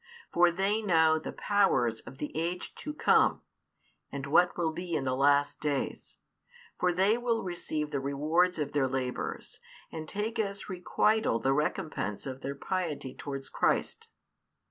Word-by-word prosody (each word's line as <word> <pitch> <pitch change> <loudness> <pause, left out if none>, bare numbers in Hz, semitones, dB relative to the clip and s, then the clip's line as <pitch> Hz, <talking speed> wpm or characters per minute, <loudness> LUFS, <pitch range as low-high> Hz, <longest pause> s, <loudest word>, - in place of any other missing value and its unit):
For 175 0 +6
they 195 +5 0
know 160 -5 +4
the - - -6
powers 155 - +2
of 130 - -12
the 150 - -5
age 170 +3 -3
to 300 - -6
come, 300 - +3 0.7
and 140 -1 -4
what 175 +5 +3
will 165 -2 +1
be 175 +1 -4
in - - 0
the 130 -1 0
last 145 +1 +3
days; 145 -3 -3 0.6
for 180 - +3
they 195 +6 +2
will 235 -2 0
receive 155 -4 -3
the 140 - -1
rewards 155 +7 +1
of 150 -2 -2
their 145 -3 +2
labours, 130 -1 -4 0.3
and 155 -1 -6
take 220 +3 -3
as 200 -2 -2
requital 205 - +1
the 135 +3 +1
recompence 150 -7 -2
of 135 -1 -6
their 140 +1 -4
piety 145 -5 -3
towards 135 -1 -6
Christ. 455 0 0
160 Hz, 155 wpm, -30 LUFS, 140-185 Hz, 0.7 s, For